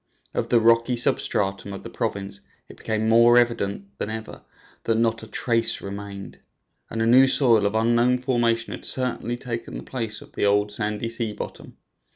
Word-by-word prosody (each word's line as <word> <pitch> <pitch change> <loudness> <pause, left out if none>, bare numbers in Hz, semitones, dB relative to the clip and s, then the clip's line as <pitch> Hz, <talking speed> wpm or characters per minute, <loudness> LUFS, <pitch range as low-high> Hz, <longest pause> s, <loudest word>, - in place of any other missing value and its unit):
Of - - -2
the 120 - +4
rocky 115 +2 +3
substratum 100 -6 +1
of 100 - -8
the - - -8
province 100 0 -3 0.3
it - - -13
became 110 0 -2
more 115 +2 +6
evident 100 -4 0
than - - -3
ever 110 0 -7 0.4
that 115 - +1
not 115 0 +1
a 110 - -10
trace 115 +1 +1
remained, 100 0 -8 0.5
and 115 0 -2
a - - +1
new 130 +3 +6
soil 115 -6 +4
of 100 - -3
unknown 120 +2 +3
formation 120 -3 0
had - - -8
certainly 125 -2 -2
taken 120 -2 -6
the - - -8
place 115 -5 -3
of - - -15
the - - -4
old 105 0 +2
sandy 105 +1 -3
sea 115 -2 -2
bottom. 105 - -9
115 Hz, 180 wpm, -24 LUFS, 105-120 Hz, 0.5 s, more